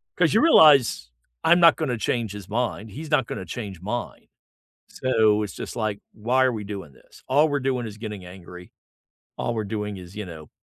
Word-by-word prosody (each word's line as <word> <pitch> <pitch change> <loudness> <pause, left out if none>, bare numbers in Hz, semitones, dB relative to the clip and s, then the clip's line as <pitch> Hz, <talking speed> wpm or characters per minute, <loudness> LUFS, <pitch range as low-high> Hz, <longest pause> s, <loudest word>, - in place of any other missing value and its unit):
'Cause 175 -1 +2
you 220 - +4
realize, 140 - +5 0.3
I'm 175 +1 +5
not 170 -1 +7
gonna 130 -7 -1
change 115 -2 -1
his 100 -3 -9
mind, 110 -2 -2
he's 155 +6 -8
not 135 -5 +2
gonna - - -5
change 100 -8 -7
mine. 120 +5 -5 0.6
So, 110 -4 +2
it's 105 - -6
just - - -7
like, 110 -3 -2
"Why 125 +5 +1
are 125 - +1
we 105 -2 -5
doing 100 -7 -7
this?" - - -20
All 150 +4 +3
we're 145 0 0
doing 130 -3 -1
is 105 0 -9
getting 105 -4 -7
angry. 90 0 -12 0.7
All 120 - -2
we're 110 - -1
doing 105 -1 -4
is, 90 +2 -12
you 105 -2 -5
know, 80 -3 -10
110 Hz, 200 wpm, -24 LUFS, 100-130 Hz, 0.7 s, not